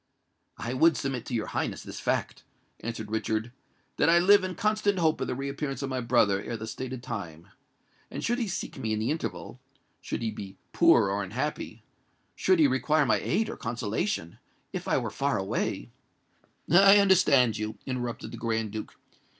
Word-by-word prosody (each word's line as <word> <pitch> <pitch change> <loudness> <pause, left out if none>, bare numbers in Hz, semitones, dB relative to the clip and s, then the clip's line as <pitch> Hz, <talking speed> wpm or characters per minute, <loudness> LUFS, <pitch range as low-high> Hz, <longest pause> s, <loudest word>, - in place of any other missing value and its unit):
"I 120 - -4
would 160 +2 +4
submit 130 -1 -3
to 125 - -3
your 110 - -1
Highness - - -3
this - - -8
fact," - - -1 0.4
answered 110 -2 -6
Richard,—"that 110 +6 -2
I 170 - +6
live 200 +3 +6
in 185 -1 -3
constant 210 -1 +1
hope 160 -3 +1
of - - -1
the - - -2
reappearance 140 0 -4
of 135 - -3
my 130 -1 -1
brother 115 -5 +3
ere 115 +2 -5
the 110 - -6
stated 130 +2 -6
time; 85 -9 -7 0.6
and - - -6
should 240 +2 0
he 230 - -1
seek 190 - -5
me 110 -1 -1
in 110 - -1
the 110 +5 0
interval—should 135 -5 -6
he 110 - -1
be 95 -2 -9 0.2
poor 100 - +5
or 100 +1 -1
unhappy—should 125 - -3
he 160 - +5
require 140 +3 +2
my - - +3
aid 220 - 0
or - - -6
consolation—if 115 - -4
I - - +2
were - - -2
far - - 0
away——" - - -2 0.8
"I 195 +3 +7
understand 145 - +4
you," 110 0 -4
interrupted 125 -3 -4
the - - -7
Grand 110 -2 -1
Duke. 110 0 -6
125 Hz, 170 wpm, -28 LUFS, 110-160 Hz, 0.8 s, I